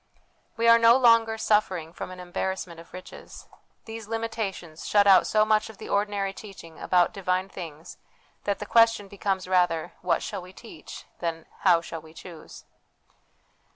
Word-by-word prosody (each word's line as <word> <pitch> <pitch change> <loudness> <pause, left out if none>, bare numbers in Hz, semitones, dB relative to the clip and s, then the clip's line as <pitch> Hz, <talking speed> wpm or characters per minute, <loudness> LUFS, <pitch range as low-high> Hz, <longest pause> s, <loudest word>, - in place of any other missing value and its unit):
We 230 0 +1
are 230 0 +7
no 230 +2 +6
longer 230 -3 +4
suffering 190 -7 0
from - - -7
an 185 0 -10
embarrassment 180 -1 -4
of 165 - -15
riches; 185 0 -11 0.4
these 225 -1 -8
limitations 220 -7 -5
shut 205 -1 +4
out 195 -2 +6
so 215 0 +3
much 215 0 +1
of 220 - -12
the - - -9
ordinary 200 -1 -1
teaching 195 -6 -12
about 180 -1 +2
divine 185 0 -1
things 165 -2 -10 0.5
that 200 -1 0
the 210 - -6
question 230 -1 +3
becomes 195 -1 -3
rather, 175 -2 +1
What 180 - 0
shall - - -5
we 180 +1 -13
teach? 190 -8 -11
than, 165 -1 -4
How 175 -3 +4
shall 165 -1 -7
we 160 +1 -17
choose 170 -3 -12
190 Hz, 160 wpm, -26 LUFS, 175-215 Hz, 0.5 s, are